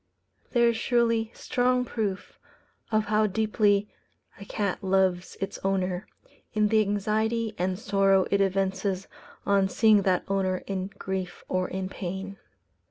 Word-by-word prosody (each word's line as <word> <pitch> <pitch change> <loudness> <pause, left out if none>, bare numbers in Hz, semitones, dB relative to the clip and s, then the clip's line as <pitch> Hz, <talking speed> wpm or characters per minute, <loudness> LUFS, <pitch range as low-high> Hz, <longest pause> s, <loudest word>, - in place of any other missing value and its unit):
There 235 -1 +5
is 230 - -1
surely 230 -2 +1
strong 250 0 +1
proof 210 -5 -4 0.5
of 215 -1 +2
how 215 +1 +2
deeply 210 0 +2 0.5
a 200 - -9
cat 200 -2 -2
loves 190 -1 +1
its 195 - -4
owner, 190 -1 -1 0.5
in 210 -1 +3
the 220 0 +4
anxiety 215 +2 0
and 185 +1 0
sorrow 195 -2 +3
it 200 - +3
evinces 195 0 0 0.4
on 200 -1 +3
seeing 215 0 +5
that 185 -2 +1
owner 190 -2 0
in 190 -1 -3
grief 190 -1 -4
or 185 0 0
in 190 0 -4
pain. 195 +1 -6
195 Hz, 135 wpm, -27 LUFS, 190-215 Hz, 0.5 s, There